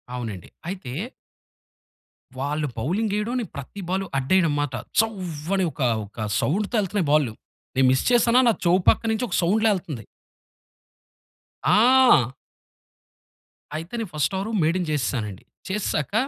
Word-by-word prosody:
అవునండి. 110 -8 -6 0.2
అయితే 180 -10 -6 1.4
వాళ్ళు 150 +3 -1
బౌలింగెయడం, 210 - -1
నేను 230 - -5
ప్రతి 140 +9 -7
బాలు 190 +1 0
అడ్డెయడంమాట. 145 -1 +1 0.3
చ్చవ్వని 190 -4 0
ఒకా, 130 -5 0 0.2
ఒక 110 +2 -6
సౌండుతో 205 - 0
యెళ్తన్నయి 195 -4 -1
బాల్లు. 145 -7 +3 0.4
నేను 130 0 +4
మిస్ 130 - +2
చేశానా, 240 0 +5
నా - - +4
చెవు 175 +2 +4
పక్కనించొక 225 +1 0
సౌండ్‌లా 215 +6 +3
యెళ్తంది. 150 - -5 1.6
ఆ! 240 - +5 1.5
అయితే, 165 +5 -8
నేను 220 -4 -4
ఫస్టవరూ 190 +9 -1
మేడిన్ 175 +3 +1
జేసేశానండి. 115 -9 -2 0.2
చేసేశాక, 190 -5 -2
175 Hz, 105 wpm, -24 LUFS, 135-210 Hz, 1.6 s, చేశానా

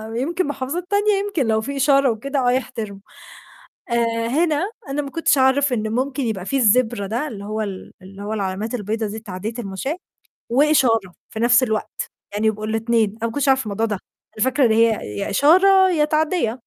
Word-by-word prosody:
يمكن 335 +8 -1
محافظات 290 +4 -3
تانية، 415 +1 +2
يمكن 315 - -1
لو 220 -1 +2
في 275 +5 -5
إشارة 275 -1 +4
وكده 275 +6 -3
آه - - +4
يحترموا. 220 -5 -3 0.9
آآ، 230 -1 0
هنا 320 - 0 0.2
أنا 280 +2 -1
ما 280 - -6
كنتش 325 -1 +1
أعرف 265 +1 +3
إن 215 -2 -2
ممكن 265 +4 -1
يبقى 215 -6 -3
في 275 +5 0
الZebra 225 -1 +3
ده، 235 +10 -2
اللي 205 -6 -8
هو 215 +1 -3
ال 195 -3 -6
اللي 195 +2 -12
هو 210 +1 -3
العلامات 205 +2 -3
البيضا 220 0 -2
دي 210 +2 -6
لتعدية 210 0 -6
المشاة، 220 - -4 0.5
وإشارة 240 - +3 0.2
في 220 - -7
نَفْس 240 +2 +5
الوقت، 220 -3 -3 0.2
يعني 210 +2 0
يبقوا 215 0 -1
الاتنين، 225 0 +1
أنا 220 +2 -6
ما - - -5
كنتش 285 -1 +1
عارفة 265 0 +3
الموضوع 215 +2 -1
ده، 210 -4 -3 0.4
أنا 215 - +2
فاكرة 260 0 +2
إن 225 - +3
هي 220 - +1
يا - - -2
إشارة، 375 - +5
يا 305 -4 +2
تعدية. 305 -5 0
235 Hz, 190 wpm, -21 LUFS, 215-280 Hz, 0.9 s, نَفْس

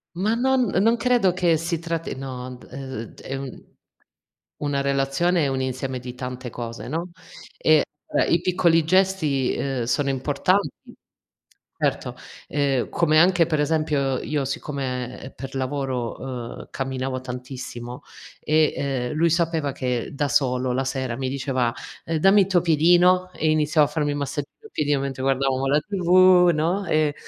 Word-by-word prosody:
Ma 200 +5 +1
non 260 +2 +2 0.2
non 230 +2 +3
credo 240 -8 +2
che 175 -3 +2
si 170 +1 -2
tratti 165 -3 -4
no, 130 -1 -7
ehm, 130 -2 -6
ed 115 - -9
è 135 - -5
un 135 -1 -7 1.0
una 145 -1 0
relazione 140 +5 +1
è - - +1
un 135 -1 -1
insieme 130 0 -3
di 125 0 -8
tante 125 -1 -6
cose, 115 0 -7
no; 170 +5 -4 0.5
e, 155 -1 +4 0.2
uhm, - - +1
i 170 0 +3
piccoli 175 -3 +3
gesti, 170 -7 +2
ehm, 135 -3 -2
sono 140 +4 0
importanti, 145 +6 -1 0.8
certo, - - -1 0.3
ehm, 140 -3 0
come 155 -2 +3
anche 175 0 +5
per 155 -3 0
esempio, 150 -3 +1
io 145 -2 -2
siccome, 130 -2 -4
ehm, 135 - -9
per 135 +1 -8
lavoro, 130 -2 -4
ehm, - - -13
camminavo 130 -1 -3
tantissimo, 125 0 -7 0.4
e, 155 0 +2
ehm, 135 -3 -2
lui 165 +2 +2
sapeva 165 -3 0
che 125 -3 -2
da 145 +1 0
solo 125 -1 +1
la 135 +2 -1
sera 130 -2 -2
mi 130 -1 -2
diceva: 130 -3 -1 0.3
"Ehm, 165 -1 -1
dammi 195 +4 +6
il 185 - +2
tuo 185 -3 +3
piedino", 175 +3 +4
e 155 - 0
iniziava 155 0 +3
a 150 - -12
farmi 150 -1 0
il 145 - -2
massaggio 140 0 -3 0.2
al 435 - -13
piedino 145 -2 0
mentre 135 -1 -4
guardavamo 135 0 +1
la 145 +2 +3
TV, 185 -1 +5
no; 170 +6 0
e 155 -2 +2
140 Hz, 160 wpm, -23 LUFS, 130-165 Hz, 1.0 s, dammi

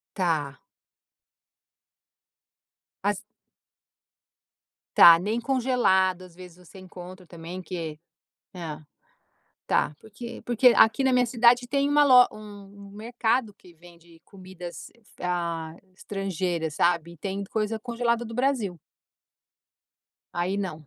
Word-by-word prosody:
Tá. 155 -7 -1 2.5
As - - 0 1.8
Tá, 170 -1 +9
nem 215 +6 -2
congelado, 235 -8 +1
às 180 -2 -14
vezes, 180 -1 -13
você 190 - -14
encontra 185 0 -12
também 170 +2 -9
que 165 -4 -6 0.6
é. - - -10 1.1
Tá, 150 - 0
porque 235 +2 -10
porque 240 +1 +3
aqui 225 +5 +4
na 265 - +3
minha 250 0 +3
cidade 240 +1 +3
tem 280 +2 0
uma 295 0 +4
lo 250 -3 +7
um 205 -1 -12
um - - -16
mercado 225 +1 -1
que 180 -3 -19
vende 170 0 -19
comidas, 185 -2 -10 0.3
ah, 170 -3 -3 0.2
estrangeiras, 180 -6 -3
sabe. 170 0 +1
E - - -17
tem 195 +4 -4
coisa 220 +1 -2
congelada 235 0 -1
do 230 - -8
Brasil. 250 -9 -1 1.6
Aí 180 +3 -1
não. 160 -7 -5
195 Hz, 110 wpm, -26 LUFS, 175-235 Hz, 2.5 s, Tá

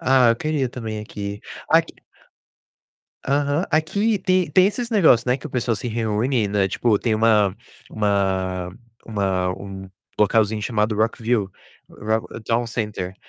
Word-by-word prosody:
Ah, 130 -2 +4
eu 115 - +1
queria 150 -1 -1
também 110 -3 -6
aqui. 100 -1 -6 0.3
Aqui - - +3 1.3
Aham. 145 +4 +1
Aqui 200 +8 +1
tem 185 -3 +1
tem 185 +5 +5
esses 235 +4 -3
negócio, 160 - +4
né, 125 - +3
que - - -9
o - - -11
pessoal 120 -2 -1
se 125 - -6
reúne, 110 0 0
né, 100 -1 +1
tipo 105 +3 +1
tem 115 0 0
uma 110 -3 +3 0.3
uma 95 -3 -1 0.3
uma 95 -4 0
um 95 -1 -9 0.3
localzinho 105 0 +2
chamado 110 0 0
Rockville, 110 0 0 0.4
Rock 110 +1 -2 0.2
Dow 115 +2 0
Center, 105 -5 -4
110 Hz, 140 wpm, -22 LUFS, 100-130 Hz, 1.3 s, tem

